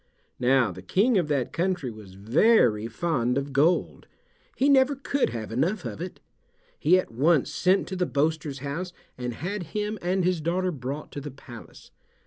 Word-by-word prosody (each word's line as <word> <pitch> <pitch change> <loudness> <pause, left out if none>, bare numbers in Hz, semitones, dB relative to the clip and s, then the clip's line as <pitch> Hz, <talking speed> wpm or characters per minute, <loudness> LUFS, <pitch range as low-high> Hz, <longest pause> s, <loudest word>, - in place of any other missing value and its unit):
Now 125 -3 +3
the 90 +1 -9
King 200 - +2
of 170 - -1
that 140 -4 -1
country 175 -7 -1
was 105 -4 -12
very 115 - +3
fond 125 -2 -1
of 140 0 -3
gold; 155 +6 +1 0.5
he 270 - +2
never 275 0 +4
could 275 +1 0
have 110 -2 -6
enough 175 - 0
of - - -6
it. 180 - -6 0.6
He 185 - +5
at 185 - -2
once 145 +5 +2
sent 190 +1 +2
to 190 - -4
the 180 -1 0
boaster's 150 -1 -1
house 175 +6 -4 0.2
and 125 -1 -4
had 195 - -4 0.2
him 210 0 -2
and 185 +1 0
his 180 -3 +1
daughter 180 +3 0
brought 140 0 -6
to 145 - -6
the 145 - -6
palace. 125 -3 -13
155 Hz, 175 wpm, -26 LUFS, 125-185 Hz, 0.6 s, He